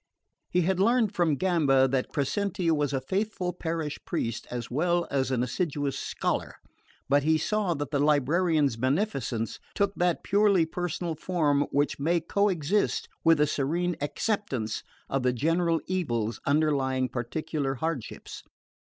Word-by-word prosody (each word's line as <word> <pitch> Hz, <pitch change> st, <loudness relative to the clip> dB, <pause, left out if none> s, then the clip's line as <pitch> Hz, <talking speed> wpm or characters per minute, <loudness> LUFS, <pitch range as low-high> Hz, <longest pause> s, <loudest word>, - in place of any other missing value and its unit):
He 180 Hz, -, +2 dB
had 185 Hz, +2 st, +1 dB
learned 225 Hz, 0 st, +3 dB
from 170 Hz, -6 st, +2 dB
Gamba 140 Hz, -5 st, +3 dB
that 130 Hz, 0 st, 0 dB
Crescenti 175 Hz, +5 st, 0 dB
was 145 Hz, -2 st, +1 dB
a 135 Hz, -, 0 dB
faithful 185 Hz, +4 st, -2 dB
parish 160 Hz, -3 st, -3 dB
priest 115 Hz, -10 st, -3 dB
as 120 Hz, -1 st, -5 dB
well 175 Hz, +5 st, +1 dB
as 135 Hz, -2 st, +1 dB
an 125 Hz, -2 st, +1 dB
assiduous 145 Hz, +1 st, -1 dB
scholar, -, -, -2 dB, 0.5 s
but 140 Hz, +1 st, +4 dB
he 160 Hz, +2 st, +3 dB
saw 205 Hz, 0 st, 0 dB
that 145 Hz, -1 st, -4 dB
the 145 Hz, -, +1 dB
librarian's 150 Hz, -1 st, +2 dB
beneficence 130 Hz, -, -1 dB, 0.2 s
took 200 Hz, -1 st, +1 dB
that 175 Hz, -2 st, 0 dB
purely 200 Hz, -4 st, +4 dB
personal 175 Hz, 0 st, -3 dB
form 150 Hz, -3 st, +1 dB
which 145 Hz, 0 st, 0 dB
may 170 Hz, +4 st, +2 dB
coexist 190 Hz, +1 st, 0 dB
with 165 Hz, -2 st, +5 dB
a 150 Hz, -, +5 dB
serene 165 Hz, +5 st, -1 dB
acceptance 145 Hz, -, -2 dB, 0.3 s
of 135 Hz, -, -1 dB
the 125 Hz, 0 st, +2 dB
general 165 Hz, +5 st, +1 dB
evils 120 Hz, -, -1 dB
underlying 140 Hz, -3 st, +2 dB
particular 135 Hz, +3 st, -3 dB
hardships. 150 Hz, -3 st, -5 dB
155 Hz, 140 wpm, -27 LUFS, 135-180 Hz, 0.5 s, with